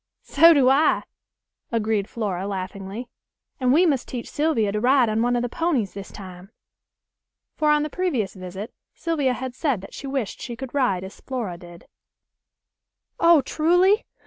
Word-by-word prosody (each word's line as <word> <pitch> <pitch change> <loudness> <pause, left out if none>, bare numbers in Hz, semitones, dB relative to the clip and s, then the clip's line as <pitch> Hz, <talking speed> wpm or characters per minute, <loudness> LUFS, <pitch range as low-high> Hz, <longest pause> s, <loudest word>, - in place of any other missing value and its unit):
"So 330 +4 +6
do 280 -5 +4
I," 275 +4 +4 0.7
agreed 220 -3 0
Flora 195 -4 -3
laughingly; 195 +4 -5 0.5
"and 255 -2 +2
we 330 +7 +5
must 275 -7 +1
teach 245 -2 -6
Sylvia 290 -9 +1
to 210 - -1
ride 250 0 +4
on 215 +1 0
one 245 +1 +2
of 240 - 0
the - - 0
ponies 265 - -1
this 195 -1 -8
time." 185 -1 -11 1.1
For 305 -1 +1
on 300 0 +4
the 305 - -3
previous 275 - -1
visit 190 +3 -8 0.2
Sylvia 295 -6 0
had 255 0 -5
said 260 - -1
that 195 - -12
she 275 - -7
wished 265 -7 -3
she 240 - -5
could 265 +1 -8
ride 245 -10 +1
as 190 - -10
Flora 240 -9 -4
did. 175 -1 -13 1.3
"Oh! 335 -3 +6
Truly? 355 - +2
245 Hz, 165 wpm, -23 LUFS, 200-290 Hz, 1.3 s, So